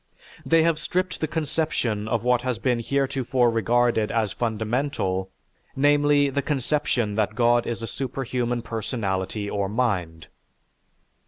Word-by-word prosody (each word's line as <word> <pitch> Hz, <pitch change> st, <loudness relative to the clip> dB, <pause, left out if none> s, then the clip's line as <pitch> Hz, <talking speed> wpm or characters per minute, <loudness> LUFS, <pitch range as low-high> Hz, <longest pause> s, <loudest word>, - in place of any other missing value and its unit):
They 165 Hz, -1 st, +4 dB
have 165 Hz, -1 st, +2 dB
stripped 185 Hz, +2 st, -2 dB
the 155 Hz, -, +1 dB
conception 150 Hz, -9 st, -1 dB
of 115 Hz, 0 st, -1 dB
what 125 Hz, 0 st, +3 dB
has 125 Hz, -2 st, -2 dB
been 125 Hz, -3 st, 0 dB
heretofore 130 Hz, -1 st, +1 dB
regarded 115 Hz, 0 st, +2 dB
as 110 Hz, -4 st, 0 dB
fundamental, 110 Hz, -4 st, -1 dB, 0.5 s
namely, 145 Hz, 0 st, +3 dB
the 140 Hz, +1 st, 0 dB
conception 135 Hz, -5 st, 0 dB
that 110 Hz, -1 st, 0 dB
God 120 Hz, 0 st, +3 dB
is 115 Hz, -1 st, -3 dB
a -, -, -1 dB
superhuman 125 Hz, -2 st, -2 dB
personality 105 Hz, -3 st, -3 dB
or 100 Hz, -1 st, -1 dB
mind. 90 Hz, -9 st, -1 dB
120 Hz, 130 wpm, -24 LUFS, 110-140 Hz, 0.5 s, They